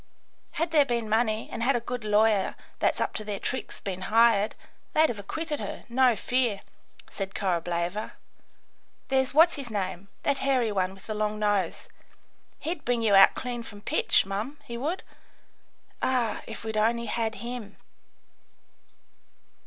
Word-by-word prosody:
Had 330 +2 -1
there 305 -3 +6
been 235 -4 -1
money, 220 0 +1
and - - -5
had 255 +3 +3
a - - +2
good 240 0 -5
lawyer 210 -1 +3 0.2
that's - - +1
up - - -1
to 215 - -4
their 205 -1 -3
tricks 260 - -4
been 190 -2 -5
hired, 225 -2 +4 0.4
they'd 315 +1 +5
have 220 - -4
acquitted 305 +8 -4
her, - - -6
no 250 0 +4
fear," 240 -4 0 0.5
said 195 -1 -5
Korableva. 175 +2 -1 1.0
"There's 265 0 +1
what's 330 +2 +6
his 270 -4 -5
name 195 -2 -3 0.2
that 280 -1 +1
hairy 255 -5 +2
one 190 -1 -1
with 195 - -16
the 215 - -3
long 215 0 -1
nose. 205 -2 0 0.7
He'd 320 -1 -4
bring 240 -1 0
you 215 -2 +3
out 195 0 +8
clean 245 -2 -3
from 205 -3 -9
pitch, - - +3
mum, 210 +9 -4
he 235 - -7
would. 300 +10 -2 1.0
Ah, 245 -4 0
if 225 - -7
we'd 220 -1 -3
only 235 +2 +2
had 225 -1 -1
him!" 235 -4 -7
225 Hz, 155 wpm, -27 LUFS, 205-255 Hz, 1.0 s, out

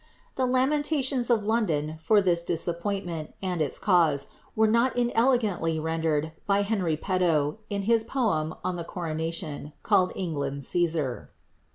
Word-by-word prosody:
The 260 -1 0
lamentations 265 -1 +1
of 225 -4 +2
London 160 -9 0
for 205 +5 +3
this 175 -2 +2
disappointment, 170 0 -3
and 180 -4 -2
its 145 - 0
cause, 165 -8 +2 0.3
were 220 - +4
not 235 +4 +2
inelegantly 230 -9 +1
rendered 160 -1 -1 0.2
by 200 0 +3
Henry 190 -7 0
Petowe, 170 -3 0
in 200 -1 -2
his 225 +1 +3
poem 210 - -1
on 180 -1 -2
the 170 - -4
coronation, 160 -3 -4
called 190 -4 +3
^ - - -10
England's 140 -6 -3
Cssar." 160 -7 0
180 Hz, 140 wpm, -27 LUFS, 160-220 Hz, 0.3 s, were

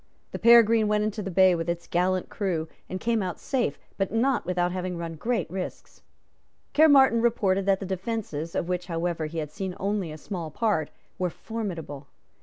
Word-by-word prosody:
The - - -5
Peregrine 230 -2 +6
went 210 0 +2
into 215 0 -2
the 195 - -4
bay 185 0 +5
with 165 0 -2
its 170 0 -2
gallant 185 +1 0
crew, 175 -6 -2 0.2
and 185 - -4
came 230 0 +1
out 180 -3 -4
safe, 260 -3 -1 0.2
but 195 -2 0
not 245 +4 +1
without 180 -1 +1
having 180 -1 -3
run 170 -1 -5
great 220 +2 -1
risks. 185 +1 -7 0.7
Caermarthen 275 -6 +6
reported 195 -5 +1
that 195 -1 +3
the 195 - -5
defences, 190 -4 -4
of 170 - -1
which 180 0 -2
however 165 -2 -2
he 165 +2 -7
had 150 -2 -3
seen 190 0 -5
only 195 -4 -1
a 155 - -7
small 170 -1 -5
part, 195 -4 0 0.3
were 180 -1 +1
formidable. 170 -10 -6
185 Hz, 185 wpm, -26 LUFS, 170-220 Hz, 0.7 s, Peregrine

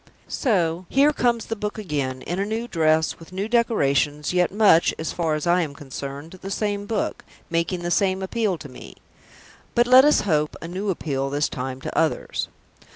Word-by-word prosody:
So 180 - 0
here 285 +3 +4
comes 235 -4 +1
the 225 - -3
book 210 0 -4
again, 140 -10 -3
in 175 +2 -3
a - - +1
new 225 +2 -3
dress, 160 -4 +1
with 165 +1 -14
new 195 +3 -3
decorations, 150 - +1
yet 180 -1 +2
much, 200 -5 +4
as 160 - -3
far 165 -3 0
as 155 - -3
I 175 +1 +3
am 150 -4 -4
concerned, 140 +5 -8
the 195 - -6
same 205 0 -2
book, 220 -1 -2 0.3
making 170 +1 -1
the 175 - -2
same 190 0 +1
appeal 205 -2 -1
to 155 - -9
me; 130 -2 -12 0.8
but, 240 0 +5
let 255 +2 +8
us 300 +1 +4
hope, 150 -6 0
a 165 - -7
new 190 +4 -3
appeal, 135 -6 -2
this 145 +2 0
time, 130 0 -5
to - - -6
others. - - 0
175 Hz, 190 wpm, -23 LUFS, 150-210 Hz, 0.8 s, let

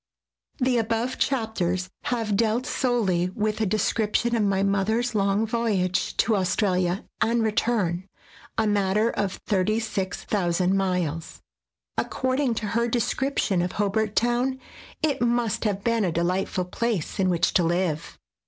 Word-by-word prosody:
[The 255 -3 +2
above 230 +3 -1
chapters 185 -8 0 0.2
have 225 -4 0
dealt 230 +3 +1
solely 225 -11 +1
with 215 +1 -1
a 215 - +2
description 215 +3 +1
of 225 - +1
my 195 -1 +2
mother's 220 +5 +1
long 200 +1 +2
voyage 210 -6 0
to 225 - +3
Australia 185 -1 +1 0.2
and 230 0 +2
return, 200 -5 0 0.5
a 220 - +2
matter 205 +2 +2
of 195 -2 -1
36,000 190 -3 0
miles. 180 -4 -2 0.6
According 260 -1 0
to 215 - -3
her 235 +2 +1
descrip 255 +4 -1
tion 185 -3 +2
of 180 +1 -2
Hobart 210 +1 0
Town, 245 +3 +1 0.4
it 295 -5 +1
must 240 -3 +1
have 200 -2 -1
been 230 -2 +2
a 180 - +1
delightful 180 +2 0
place 210 -1 -2
in 185 -1 +3
which 170 -1 +2
to - - +4
live. 170 -2 -1
210 Hz, 135 wpm, -25 LUFS, 185-230 Hz, 0.6 s, to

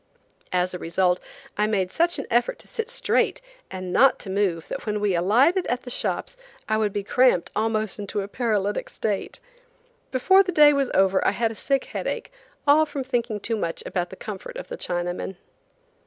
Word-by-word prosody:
As 180 0 +1
a 180 - -5
result, 180 +2 +1 0.4
I 210 - +3
made 190 -4 0
such 340 +1 +2
an - - -4
effort 240 +1 +2
to - - -16
sit 455 -1 -4
straight - - +1 0.3
and 185 -1 -5
not 270 +1 +5
to 190 - -6
move 190 -5 0
that - - -6
when 210 0 0
we 205 -2 +1
alighted 245 - +3
at 245 +1 -1
the 245 - -6
shops - - -2 0.3
I 215 - +1
would 215 -1 +1
be 200 0 -3
cramped 250 -3 +3
almost 215 -1 -1
into 205 0 -3
a 195 - -5
paralytic 210 -3 -1
state. 205 -3 -3 0.7
Before 380 +10 +5
the 375 -2 -1
day 300 -3 +7
was 275 -2 +1
over 190 0 +3
I - - +2
had 230 +1 0
a - - -8
sick 275 +4 0
headache, - - -4 0.3
all 300 +2 +5
from 285 -2 -4
thinking 240 -4 -2
too 225 +3 -2
much 165 -5 -2
about 175 -2 -2
the - - -9
comfort 215 - -7
of - - -8
the - - -4
Chinamen. 175 - -3
215 Hz, 195 wpm, -24 LUFS, 190-260 Hz, 0.7 s, day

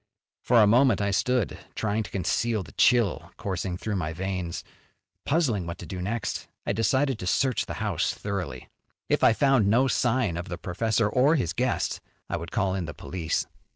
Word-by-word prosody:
For 120 -1 +4
a 105 - +7
moment 120 +1 +4
I 100 -1 0
stood, 125 +2 0 0.2
trying 110 0 0
to 105 - -6
conceal 105 +3 0
the - - -13
chill 120 -6 +3
coursing 95 -2 -3
through 105 +1 -3
my 80 -3 -2
veins, 90 -1 -3 0.6
puzzling 130 - +1
what 85 - -5
to - - -8
do 95 -2 -6
next. 110 +4 -3 0.2
I - - 0
decided 130 +3 +1
to 90 - -5
search 130 +6 +1
the - - -5
house - - 0
thoroughly. 90 - -5 0.4
If - - +2
I - - +7
found 135 -4 +3
no 120 +6 +4
sign 120 -8 +1
of 85 - -5
the 85 - -4
professor 110 +4 0
or 130 +8 +3
his 105 - 0
guest, - - -1 0.3
I - - 0
would 85 0 -7
call 95 -2 0
in 95 -3 -2
the 80 - -7
police. 85 -3 -2
100 Hz, 190 wpm, -26 LUFS, 90-120 Hz, 0.6 s, a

